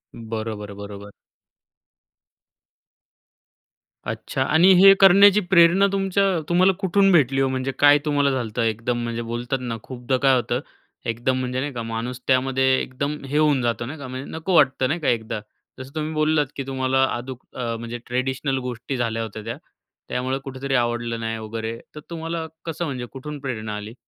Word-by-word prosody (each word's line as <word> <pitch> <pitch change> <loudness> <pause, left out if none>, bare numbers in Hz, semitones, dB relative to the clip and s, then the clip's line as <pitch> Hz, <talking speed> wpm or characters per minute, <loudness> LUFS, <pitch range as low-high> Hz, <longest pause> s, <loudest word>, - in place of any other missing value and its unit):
बरोबर, 110 -2 -5
बरोबर. 100 0 -9 3.0
अच्छा 130 - -2
आणि 160 +7 +5
हे 195 0 +10
करण्याची 200 +1 +7
प्रेरणा 185 +2 +6
तुमच्या 195 0 +1 0.3
तुम्हाला 185 +2 +4
कुठून 195 0 +3
भेटली 135 -5 +3
हो? 135 - +3
म्हणजे 130 0 -2
काय 145 0 +7
तुम्हाला 145 -2 +2
झालतं 120 -3 -2
एकदम 115 +2 -1
म्हणजे 115 0 -3
बोलतात 120 +3 -3
ना, 120 -2 -4
खूपदा 130 0 -2
काय 135 0 +4
होतं, 120 0 0 0.5
एकदम 120 +3 0
म्हणजे 125 0 -2
नाही 145 +1 -3
का, 120 - -4
माणूस 115 +2 -4
त्यामध्ये 130 0 +2
एकदम 140 +3 -3
हे 145 +2 -2
होऊन 150 -4 +3
जातो 120 -1 -1
नाही 145 +5 -7
का; 140 - -7
म्हणजे 130 +1 -7
नको 165 +3 -2
वाटतं 130 -3 +4
नाही 170 +5 -1
का 155 - -3
एकदा. 110 -2 -1 0.4
जसं 130 +3 -10
तुम्ही 155 0 -3
बोललात, 155 -1 +2
की 135 - -3
तुम्हाला 130 0 +1
अदूक 125 +1 -7
म्हणजे 115 0 -4
ट्रेडिशनल 130 +2 -1
गोष्टी 125 +2 -4
झाल्या 115 -2 -1
होत्या 110 -1 -7
त्या. 115 +3 -5 0.5
त्यामुळं 130 +2 -1
कुठेतरी 135 0 -3
आवडलं 120 -1 -1
नाही 115 0 -3
वगैरे. 110 +1 -5 0.2
तर 150 - -6
तुम्हाला 165 -1 -4 0.2
कसं 165 +1 -3
म्हणजे 130 -5 -4
कुठून 145 +2 -7
प्रेरणा 110 -6 -4
आली? 105 +2 -8
130 Hz, 160 wpm, -23 LUFS, 115-150 Hz, 3.0 s, हे